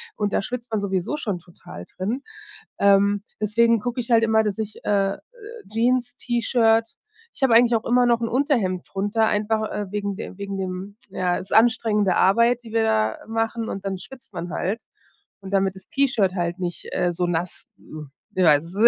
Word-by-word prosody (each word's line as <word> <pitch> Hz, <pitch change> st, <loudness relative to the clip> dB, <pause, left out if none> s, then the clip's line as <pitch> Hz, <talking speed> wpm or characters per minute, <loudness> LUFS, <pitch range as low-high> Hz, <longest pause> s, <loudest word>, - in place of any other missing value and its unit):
und 205 Hz, -1 st, -1 dB
da -, -, +2 dB
schwitzt 240 Hz, +2 st, -6 dB
man 215 Hz, -, +1 dB
sowieso 195 Hz, +8 st, -1 dB
schon 205 Hz, -10 st, -3 dB
total 170 Hz, -, -12 dB
drin. 225 Hz, +9 st, -2 dB, 0.6 s
Ähm, 200 Hz, 0 st, +4 dB, 0.2 s
deswegen 230 Hz, +1 st, +3 dB
gucke 245 Hz, +2 st, -4 dB
ich 240 Hz, -, -6 dB
halt 225 Hz, -1 st, +5 dB
immer, 220 Hz, 0 st, +3 dB
dass 210 Hz, +1 st, -2 dB
ich, 215 Hz, -1 st, -5 dB
äh 195 Hz, -1 st, +1 dB
äh, -, -, -24 dB, 0.5 s
Jeans, 245 Hz, +2 st, +1 dB
T-Shirt 230 Hz, -2 st, +2 dB, 0.5 s
ich -, -, -6 dB
habe 245 Hz, -4 st, +5 dB
eigentlich 235 Hz, 0 st, +6 dB
auch 220 Hz, -, -3 dB
immer 245 Hz, +1 st, +4 dB
noch 235 Hz, -1 st, +3 dB
'n 230 Hz, -, 0 dB
Unterhemd 235 Hz, -, 0 dB
drunter, 205 Hz, +3 st, +1 dB
einfach, 215 Hz, +1 st, 0 dB
äh, 205 Hz, -1 st, -3 dB
wegen 200 Hz, -1 st, -3 dB
der 200 Hz, -, -7 dB
wegen 200 Hz, -1 st, -4 dB
dem 190 Hz, +2 st, -5 dB
ja, 180 Hz, -2 st, 0 dB
ist 190 Hz, -, -9 dB
anstrengende 220 Hz, -4 st, +3 dB
Arbeit, 235 Hz, +5 st, +4 dB
die 225 Hz, -, -10 dB
wir 225 Hz, -1 st, +2 dB
da 110 Hz, -, +1 dB
machen, 225 Hz, 0 st, -2 dB
und 195 Hz, 0 st, -6 dB
dann 190 Hz, -1 st, -2 dB
schwitzt 245 Hz, +2 st, -13 dB
man 175 Hz, 0 st, -5 dB
halt 205 Hz, +9 st, -2 dB, 0.6 s
und 195 Hz, 0 st, -9 dB
damit 195 Hz, -1 st, +1 dB
das 190 Hz, -, -14 dB
T-Shirt 240 Hz, -9 st, +1 dB
halt 175 Hz, 0 st, -2 dB
nicht, 175 Hz, -1 st, -4 dB
äh, 175 Hz, 0 st, +1 dB
so 175 Hz, +1 st, -1 dB
nass, 175 Hz, 0 st, -3 dB
äh 155 Hz, -1 st, -10 dB, 0.3 s
ich 185 Hz, -, +4 dB
weiß, 150 Hz, -1 st, +5 dB
es 175 Hz, -, -11 dB
210 Hz, 195 wpm, -23 LUFS, 190-230 Hz, 0.6 s, eigentlich